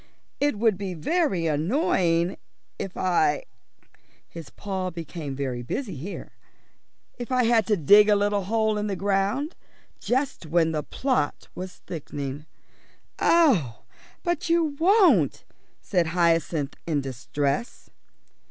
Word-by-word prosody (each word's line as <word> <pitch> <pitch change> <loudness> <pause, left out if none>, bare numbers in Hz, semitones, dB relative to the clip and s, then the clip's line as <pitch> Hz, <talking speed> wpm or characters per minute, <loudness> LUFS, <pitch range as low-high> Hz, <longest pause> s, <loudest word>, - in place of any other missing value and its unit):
It 290 -5 +1
would 215 -3 +2
be 190 -3 -4
very 190 - 0
annoying 170 - +1 0.4
if 195 - -5
I" 365 - +2 0.8
his 165 -3 -10
paw 190 -2 -4
became 165 -4 -6
very 130 -3 -3
busy 195 - -4
here 165 +9 -7 0.9
"if 240 +1 -6
I 255 -1 +3
had 230 -1 +3
to 210 -2 +2
dig 205 +7 +6
a 210 - +6
little 205 -1 0
hole 220 0 +1
in 210 - -2
the 200 - -2
ground, 200 - 0 0.4
just 255 - -1
when 165 0 +2
the 155 -1 -1
plot 250 - -2
was 185 0 -8
thickening." 145 -2 -6 0.7
"Oh, 220 - +3 0.4
but 345 -2 -1
you 330 -3 +2
won't," 390 +3 +4 0.4
said 175 -4 +1
Hyacinth, 165 -3 +1
in 150 -4 +1
distress. 140 - -3
190 Hz, 125 wpm, -25 LUFS, 160-235 Hz, 0.9 s, dig